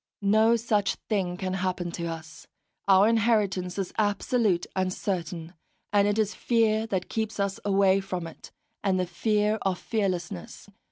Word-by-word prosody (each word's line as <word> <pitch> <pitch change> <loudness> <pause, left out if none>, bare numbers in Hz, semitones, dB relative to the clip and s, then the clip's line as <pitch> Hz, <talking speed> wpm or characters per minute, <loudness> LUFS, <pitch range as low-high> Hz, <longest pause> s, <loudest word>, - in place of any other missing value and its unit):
No 220 +3 +5
such 215 -3 +1
thing 185 -4 0
can 185 -1 -3
happen 180 -2 -2
to 170 0 -4
us; 160 -1 -8 0.4
our 195 +1 +6
inheritance 210 -5 +1
is 195 -2 -3
absolute 205 -2 +1
and 185 -1 0
certain, 175 -3 -4 0.4
and 205 0 +4
it 205 +1 +1
is 215 -1 +1
fear 225 -2 +1
that 190 -4 -2
keeps 220 -1 -3
us 200 -1 -1
away 195 -1 +3
from 185 -3 -4
it, 165 - -11 0.3
and 190 -2 +2
the 180 - +1
fear 210 +3 +1
of 190 -2 0
fearlessness. 185 -5 -3
195 Hz, 155 wpm, -27 LUFS, 180-215 Hz, 0.4 s, our